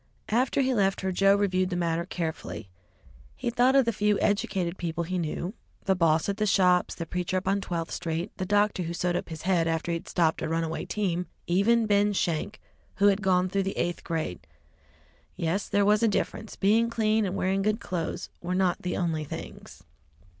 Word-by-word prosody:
After 250 +5 +2
he 260 -1 +1
left 195 -4 +1
her, 190 0 -1
Joe 195 +2 +4
reviewed 185 -2 +1
the 180 - -2
matter 170 0 -1
carefully. 160 - -5 0.7
He 235 - -2
thought 250 +3 +3
of 270 -2 +5
the 230 - +1
few 210 0 +1
educated 190 -3 0
people 170 0 -2
he 180 +2 -2
knew 170 +3 -3 0.3
the 195 - +3
boss 165 -3 +2
at 200 0 -1
the 215 -1 +1
shops, 180 -2 +3
the 170 - -5
preacher 180 +2 -2
up 185 - -3
on 195 +1 +2
Twelfth 170 -3 -3
Street, 165 +4 -3
the 185 - -2
doctor 205 -1 +2
who 170 0 -3
sewed 175 0 0
up 180 - -3
his 160 -1 -7
head 175 -2 +2
after 165 +1 -1
he 165 -1 -1
stopped 165 -3 +1
a - - -2
runaway 165 0 -2
team, 180 -4 -1 0.2
even 220 +6 +3
Ben 205 0 +3
Schenk, 175 +2 -1 0.4
who 205 0 +5
had 200 0 +1
gone 185 -2 +2
through 195 +1 0
the 195 0 -3
eighth 175 0 -1
grade. 160 - -4 0.9
Yes, 170 +5 -1
there 200 0 +3
was 210 +1 +4
a 230 - +4
difference. 215 +1 -2
Being 220 +4 +3
clean 220 -1 +1
and 190 -1 -2
wearing 195 0 0
good 215 +2 +1
clothes 170 -6 -4
were 180 +1 -2
not 185 -1 +1
the 180 - -2
only 165 -4 -1
things. 150 - -9
185 Hz, 200 wpm, -27 LUFS, 170-205 Hz, 0.9 s, of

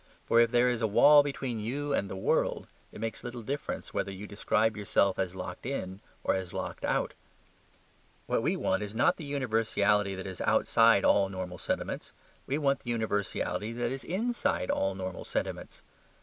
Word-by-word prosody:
For 115 - +4
if 115 0 +5
there 120 +1 +4
is 120 -2 0
a 110 - +2
wall 145 +8 +7
between 135 -5 -3
you 140 +7 -2
and 100 -7 0
the - - -5
world, 95 - 0 0.3
it - - -10
makes 115 +1 -4
little 120 -1 -6
difference 140 +5 -4
whether 100 - -1
you 95 +2 -7
describe 105 +1 +1
yourself 100 -2 +1
as 95 -1 -1
locked 90 -1 -6
in 95 -8 -4 0.2
or - - +2
as 95 -2 -3
locked - - -5
out. - - 0 1.1
What - - 0
we - - +1
want 95 +1 0
is 105 +1 -5
not 115 - +3
the 155 - -7
universality 110 -7 +1
that 95 - -6
is 95 -2 -6
outside - - +4
all 100 -1 +4
normal 90 -2 -6
sentiments; - - -3 0.3
we 140 - 0
want 140 -2 +1
the 120 - -9
universality 110 -1 -1
that 120 0 -1
is 135 0 -4
inside 225 - -1
all 95 0 0
normal 95 -1 -5
sentiments. - - -4
110 Hz, 180 wpm, -30 LUFS, 95-130 Hz, 1.1 s, wall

